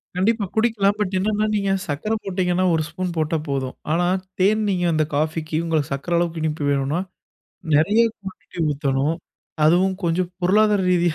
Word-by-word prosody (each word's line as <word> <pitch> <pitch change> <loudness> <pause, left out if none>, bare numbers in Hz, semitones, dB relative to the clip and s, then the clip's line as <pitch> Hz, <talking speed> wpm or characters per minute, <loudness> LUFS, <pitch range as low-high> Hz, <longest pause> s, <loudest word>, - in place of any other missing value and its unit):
கண்டிப்பா 205 +3 +1
குடிக்கலாம். 220 -3 +2
பட் 195 -2 -1
என்னன்னா 210 +2 +1
நீங்க 200 -1 0 0.2
சக்கர 155 +9 -3
போட்டீங்கன்னா 185 -1 0
ஒரு 160 -1 +1
ஸ்பூன் 175 0 -4
போட்டா 160 +1 +1
போதும். 135 -2 -2 0.2
ஆனா 175 +1 +2 0.3
தேன் 210 +3 +3
நீங்க 180 -2 0
அந்த 155 0 +2
காஃபிக்கு 155 +1 -1
உங்க 160 -2 +1
சக்கர 155 +5 -2
அளவுக்கு 170 -2 -1
இனிப்பு 155 -1 -2
வேணும்னா 140 +4 0 0.8
நெறய 200 +10 +4 0.2
குவாண்டிட்டி 190 -2 -11
ஊத்தணும். 140 +2 0 0.5
அதுவும் 185 +4 +4
கொஞ்சம் 175 +1 +1
பொருளாதார 205 +2 +3
ரீதியா 175 -2 +2
175 Hz, 150 wpm, -22 LUFS, 155-195 Hz, 0.8 s, நெறய